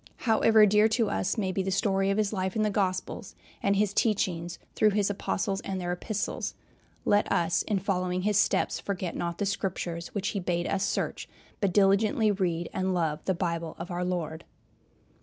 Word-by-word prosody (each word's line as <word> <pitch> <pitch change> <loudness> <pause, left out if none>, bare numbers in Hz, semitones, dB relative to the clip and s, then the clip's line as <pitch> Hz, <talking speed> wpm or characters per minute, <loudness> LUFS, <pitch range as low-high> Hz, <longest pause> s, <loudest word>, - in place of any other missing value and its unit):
However 220 -1 +6
dear 210 +1 +5
to 220 -1 +1
us 195 - -1
may 195 -3 0
be 190 - -1
the 190 - -2
story 195 0 +1
of 195 - +1
his 215 -1 +1
life 190 -1 -2
in 215 - +2
the 210 - +1
Gospels 185 -2 -2 0.3
and 200 0 +2
his 200 0 +1
teachings 175 -6 0 0.2
through 215 - +4
his 205 -1 +1
Apostles 195 0 -2
and 190 -1 -4
their 175 -1 -2
Epistles, 200 +4 -3 0.5
let 205 0 +3
us 170 0 +2
in 210 - -1
following 185 -1 -1
his 210 +1 +1
steps - - +1
forget 185 -3 -3
not 170 -1 -3
"the 205 - -1
Scriptures" 180 -3 -3
which 200 -1 -1
he 200 - -2
bade 175 -1 -1
us 200 -1 0
search, - - -2 0.3
but 200 -3 +1
diligently 205 +3 +3
read 175 -4 -1
and 185 0 0
love 160 -3 -1
the 190 - +1
Bible 170 -1 -2
of 175 +2 -7
our 175 +1 -2
Lord. 170 -3 -3
195 Hz, 190 wpm, -28 LUFS, 175-205 Hz, 0.5 s, However